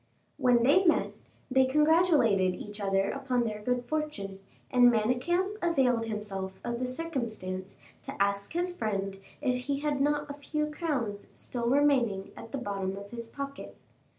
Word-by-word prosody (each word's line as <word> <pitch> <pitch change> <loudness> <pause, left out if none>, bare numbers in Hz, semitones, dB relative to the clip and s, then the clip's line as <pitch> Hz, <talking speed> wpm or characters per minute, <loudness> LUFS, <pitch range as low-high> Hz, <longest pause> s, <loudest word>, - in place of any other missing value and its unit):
When 245 -2 +4
they 290 +10 +5
met, 340 - +3 0.4
they 265 0 +5
congratulated 295 - +4
each 210 +2 -8
other 195 0 +1
upon 260 -3 0
their 215 -2 -3
good 245 +2 -1
fortune, 240 -10 -3 0.3
and 245 -1 +7
Manicamp 255 - +1
availed 255 -9 +2
himself 195 -3 -4
of 240 0 -3
the 255 - -1
circumstance 230 - -4 0.2
to - - -8
ask 200 +3 0
his 355 +1 -1
friend 195 - -2 0.2
if 250 -3 0
he 280 0 -1
had 295 -2 0
not 295 +1 +1
a 285 - -5
few 300 +1 -2
crowns 265 - -2
still 235 -1 -3
remaining 255 -8 +2
at 230 - -10
the 275 - -2
bottom 195 -5 -3
of 200 0 -9
his 235 -1 -7
pocket. 280 +2 -7
245 Hz, 155 wpm, -29 LUFS, 205-290 Hz, 0.4 s, and